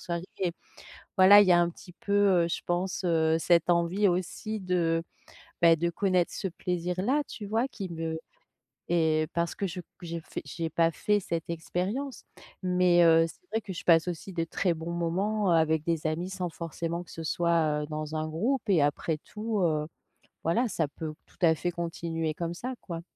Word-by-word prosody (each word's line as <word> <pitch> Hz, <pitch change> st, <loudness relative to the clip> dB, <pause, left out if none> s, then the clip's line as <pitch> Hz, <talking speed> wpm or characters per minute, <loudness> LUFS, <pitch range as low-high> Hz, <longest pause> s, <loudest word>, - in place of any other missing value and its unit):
soirées. 170 Hz, 0 st, -4 dB, 0.9 s
Voilà, 200 Hz, +2 st, +9 dB
il 200 Hz, -, +3 dB
y -, -, +6 dB
a 175 Hz, -, +6 dB
un 170 Hz, -, +2 dB
petit 180 Hz, +1 st, -14 dB
peu, 200 Hz, -, -7 dB, 0.3 s
heu, -, -, -2 dB
je -, -, -2 dB
pense, 180 Hz, +2 st, -1 dB
heu, 160 Hz, -1 st, +3 dB
cette 170 Hz, +1 st, +3 dB
envie 175 Hz, +4 st, +3 dB
aussi 185 Hz, +4 st, -2 dB
de, 170 Hz, -3 st, 0 dB, 0.6 s
beh, 165 Hz, -1 st, +7 dB
de 170 Hz, +2 st, 0 dB
connaître 185 Hz, -1 st, +1 dB
ce 195 Hz, -, -3 dB
plaisir-là, 180 Hz, -, -1 dB
tu 210 Hz, -, -7 dB
vois, 225 Hz, +5 st, +1 dB
qui 195 Hz, -8 st, -7 dB
me 165 Hz, -1 st, -3 dB, 0.7 s
et 155 Hz, -2 st, +2 dB
parce 170 Hz, 0 st, 0 dB
que 200 Hz, -, -2 dB
je 180 Hz, +1 st, -6 dB, 0.2 s
j'ai 170 Hz, 0 st, -4 dB
fait -, -, -7 dB
j'ai 165 Hz, -1 st, -4 dB
pas 165 Hz, -1 st, +3 dB
fait 205 Hz, +6 st, +1 dB
cette 165 Hz, -2 st, -3 dB
expérience. 190 Hz, -, -3 dB, 0.4 s
Mais, 180 Hz, -1 st, +4 dB
heu, 165 Hz, 0 st, +6 dB
c'est 360 Hz, -, -15 dB
vrai 225 Hz, 0 st, 0 dB
que 200 Hz, -, -8 dB
je 175 Hz, -, -7 dB
passe 165 Hz, 0 st, +5 dB
aussi 180 Hz, +2 st, -5 dB
de 165 Hz, -1 st, -1 dB
très 175 Hz, +1 st, 0 dB
bons 165 Hz, +1 st, -5 dB
moments, 185 Hz, +4 st, 0 dB
heu, 170 Hz, -, +5 dB
avec 160 Hz, -1 st, +2 dB
des 165 Hz, -2 st, 0 dB
amis 170 Hz, +4 st, -2 dB
sans 180 Hz, -2 st, -3 dB
forcément 170 Hz, +1 st, -4 dB
que -, -, -16 dB
ce 165 Hz, -, -7 dB
soit, 160 Hz, -2 st, +1 dB
heu, -, -, -6 dB
dans 155 Hz, 0 st, -4 dB
un 155 Hz, 0 st, -1 dB
groupe 225 Hz, -, 0 dB
et 170 Hz, -6 st, +4 dB
après 150 Hz, +2 st, 0 dB
tout, 215 Hz, +2 st, -4 dB
heu, 155 Hz, -3 st, +1 dB, 0.6 s
voilà, 230 Hz, +10 st, +2 dB
ça 160 Hz, -6 st, 0 dB
peut 155 Hz, +2 st, -6 dB, 0.2 s
tout -, -, -24 dB
à 165 Hz, -2 st, +6 dB
fait 175 Hz, +3 st, -2 dB
continuer 165 Hz, -2 st, -3 dB
comme 170 Hz, 0 st, -3 dB
ça, 255 Hz, +7 st, -5 dB
quoi. 170 Hz, -3 st, -6 dB
170 Hz, 195 wpm, -28 LUFS, 165-185 Hz, 0.9 s, Voilà